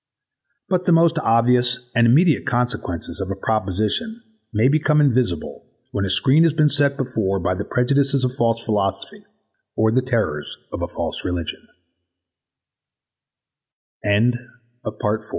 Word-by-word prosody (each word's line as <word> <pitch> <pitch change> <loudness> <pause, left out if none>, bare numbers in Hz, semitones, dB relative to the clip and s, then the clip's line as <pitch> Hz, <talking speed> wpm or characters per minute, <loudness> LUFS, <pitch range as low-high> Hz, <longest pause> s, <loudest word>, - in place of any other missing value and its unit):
But 180 -2 0
the - - +3
most 165 -1 +4
obvious 125 0 +1
and 120 0 +4
immediate 155 +6 +3
consequences 120 -8 -2
of 95 - -4
a - - -2
proposition 110 - -1 0.3
may 110 +3 +2
become 150 +1 +2
invisible 125 - 0 0.2
when 100 - -1
a - - -3
screen 135 - +4
has 165 -3 +3
been 155 -2 +4
set 140 -1 +1
before 110 -8 -1
by 90 +1 0
the 100 +2 -4
prejudices 140 +1 +1
of 125 - -2
false 115 -3 0
philosophy 100 -3 -2 0.5
or 110 0 +2
the 130 +3 +2
terrors 110 - -2
of - - -5
a - - -2
false - - -4
reli 90 -2 -2
125 Hz, 130 wpm, -21 LUFS, 105-140 Hz, 0.5 s, most